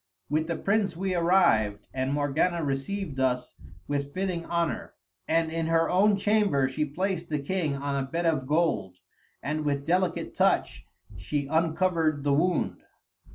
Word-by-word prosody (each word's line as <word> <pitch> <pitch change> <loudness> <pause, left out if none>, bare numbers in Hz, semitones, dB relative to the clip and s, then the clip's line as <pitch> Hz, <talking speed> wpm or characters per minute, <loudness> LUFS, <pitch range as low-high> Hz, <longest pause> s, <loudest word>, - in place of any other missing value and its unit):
"'With 155 +2 0
the 170 - -1
prince 200 -3 0
we 190 +1 -1
arrived, 170 - +3
and 130 0 -1
Morgana 150 +4 +1
received 140 +3 -3
us 125 -1 0 0.3
with 140 0 -3
fitting 185 -3 -2
honour. 170 -2 -2 0.3
And 160 0 +1
in 165 0 -1
her 165 0 +2
own 200 +3 +4
chamber 200 -9 +2
she 150 +4 -1
placed 175 +3 -3
the 150 - 0
king 150 0 -1
on 140 0 -2
a - - -7
bed 170 +4 -2
of 155 -6 +1
gold, 150 - 0 0.5
and 155 +1 -2
with 140 -1 -1
delicate 180 +1 0
touch, - - +1 0.3
she 140 +10 -2
uncovered 160 -1 +1
the 145 -1 +2
wound. 170 +3 +1
160 Hz, 155 wpm, -27 LUFS, 140-180 Hz, 0.5 s, own